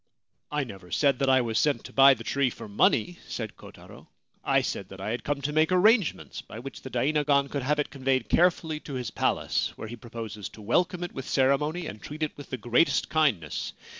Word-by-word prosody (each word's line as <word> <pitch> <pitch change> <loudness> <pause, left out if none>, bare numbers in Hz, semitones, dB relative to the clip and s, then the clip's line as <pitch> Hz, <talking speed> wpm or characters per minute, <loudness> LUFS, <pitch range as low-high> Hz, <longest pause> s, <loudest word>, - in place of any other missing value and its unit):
* - - -50
I 150 -1 0
never 95 -7 -10
said 140 - +2
that 135 - +2
I 130 -1 +5
was 115 -2 0
sent 150 -2 +1
to - - -11
buy 135 0 +7
the 115 - -9
tree 140 +2 +1
for - - -9
money,' 110 +10 +2
said 110 -3 -5
Kotaro. - - -14 0.2
* - - -42
I - - +4
said - - -4
that - - -11
I 105 - -3
had 120 0 -3
come 140 -1 -2
to 150 +2 -1
make 155 +3 +3
arrangements 205 +1 +2
by - - -11
which - - -8
the - - -8
dainagon 145 -1 +2
could 140 - -2
have 145 +4 +1
it 150 - -1
conveyed 130 -1 0
carefully 165 -3 +2
to 145 -2 -8
his 125 -1 -4
palace, - - 0
where - - -7
he 120 - -7
proposes 115 -3 -7
to 110 - -14
welcome 175 - +1
it 175 - -5
with 135 - -6
ceremony 150 +6 +1
and 105 - -7
treat 155 +2 -6
it 155 - -2
with 145 - -11
the 130 - -3
greatest 120 +8 +2
kindness. 125 - 0
140 Hz, 225 wpm, -27 LUFS, 120-150 Hz, 0.2 s, buy